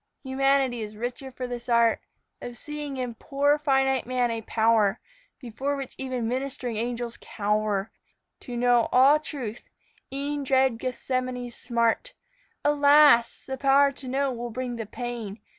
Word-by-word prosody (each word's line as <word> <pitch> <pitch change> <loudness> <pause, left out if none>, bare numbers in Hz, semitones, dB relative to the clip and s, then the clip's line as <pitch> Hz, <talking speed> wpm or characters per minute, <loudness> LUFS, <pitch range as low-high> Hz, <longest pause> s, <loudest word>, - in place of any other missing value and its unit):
Humanity 265 -2 +1
is 215 0 -6
richer 245 +4 -5
for 255 0 -6
this 245 -1 -6
art 235 -1 +3 0.4
Of 245 0 -7
seeing 295 -1 -6
in 250 -2 -3
poor 285 +5 +1
finite 270 -4 +1
man 250 -1 +1
a 230 0 -3
power 220 -1 +2 0.4
Before 270 +2 -3
which 275 -2 -6
even 255 -3 -2
ministering 255 -1 -3
angels 235 +1 -3
cower 210 0 -1 0.5
To 245 -1 -7
know 245 -1 +3
all 275 +4 +6
truth, 255 -8 -6 0.5
e'en 285 +1 -3
dread 265 -3 +2
Gethsemane's 255 -1 -3
smart. 235 - -1 0.5
Alas! 290 -4 +5
the 265 0 -4
power 275 +1 +5
to 275 -1 -9
know 270 +1 0
will 240 -1 -5
bring 245 0 -4
the 225 -3 -5
pain. 230 -3 -6
250 Hz, 140 wpm, -26 LUFS, 235-275 Hz, 0.5 s, all